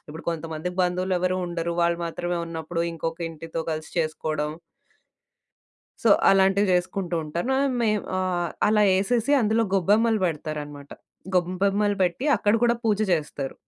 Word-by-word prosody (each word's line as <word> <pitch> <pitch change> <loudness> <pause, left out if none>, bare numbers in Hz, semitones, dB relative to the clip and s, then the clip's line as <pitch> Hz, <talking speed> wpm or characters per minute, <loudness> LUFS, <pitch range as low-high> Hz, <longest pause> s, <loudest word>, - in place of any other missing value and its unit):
ఇప్పుడు 160 +2 -9
కొంతమందికి 165 +2 -5
బంధువులెవ్వరూ 185 0 0
ఉండరు, 170 0 -3
వాళ్ళు 170 0 +1
మాత్రమే 175 +1 -3
ఉన్నప్పుడు, 165 +1 -4
ఇంకొకింటితో 165 0 -5
కలిసి 155 0 -4
చేసుకోడం. 155 -1 -1 1.5
సో, - - +3 0.2
అలాంటివి 195 +1 +4
జేసుకుంటూంటాను. 175 0 -1
నా - - +2 0.3
మేమ్ 215 -2 +1
ఆహ్, 180 -2 -1 0.2
అలా 210 0 +4 0.2
ఎసేసి 235 +6 +1
అందులో 220 0 +2
గొబ్బెమ్మలు 215 +4 +3
బెడతారనమాట. 150 -3 -4 0.4
గొబ్బెమ్మలు 195 +3 +1
బెట్టి, 180 +9 0
అక్కడ 205 0 +2
కూడా 235 0 +4
పూజ 210 -2 +2
జేస్తారు. 150 -4 -2
175 Hz, 120 wpm, -25 LUFS, 165-195 Hz, 1.5 s, అలాంటివి